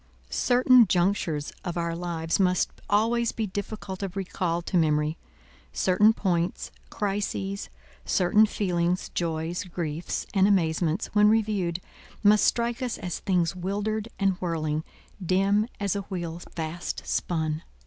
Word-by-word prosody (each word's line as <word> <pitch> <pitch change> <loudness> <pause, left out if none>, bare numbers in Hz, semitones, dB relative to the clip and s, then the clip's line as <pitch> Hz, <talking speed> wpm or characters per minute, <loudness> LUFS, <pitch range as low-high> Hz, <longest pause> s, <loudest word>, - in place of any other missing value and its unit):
Certain 250 - +5
junctures 175 -5 0
of 175 -1 -4
our 170 -1 -1
lives 170 -1 -2
must 180 -1 +2 0.2
always 230 +3 +2
be 220 - -2
difficult 200 -1 -5
of 195 -2 -4
recall 180 -3 -1
to 185 - -4
memory. 155 -2 +2 0.6
Certain 205 +4 +4
points, 175 -5 -1 0.2
crises, 200 -1 -2 0.3
certain 210 +4 +4
feelings, 180 -3 -1
joys, 165 +1 -2
griefs, 170 -2 -3
and 195 -1 +4
amazements, 170 -2 +1
when 210 0 +6
reviewed, 205 -6 +1 0.4
must 210 0 +6
strike 235 +1 +1
us 250 -3 -2
as 180 -2 -4
things 180 -3 +1
wildered 205 +4 -2
and 195 -2 +1
whirling, 155 -3 -1 0.4
dim 195 +4 +2
as 200 -2 0
a 200 - -1
wheel 175 -4 -5
fast 165 +1 -5
spun. 160 -2 -1
185 Hz, 130 wpm, -26 LUFS, 170-205 Hz, 0.6 s, when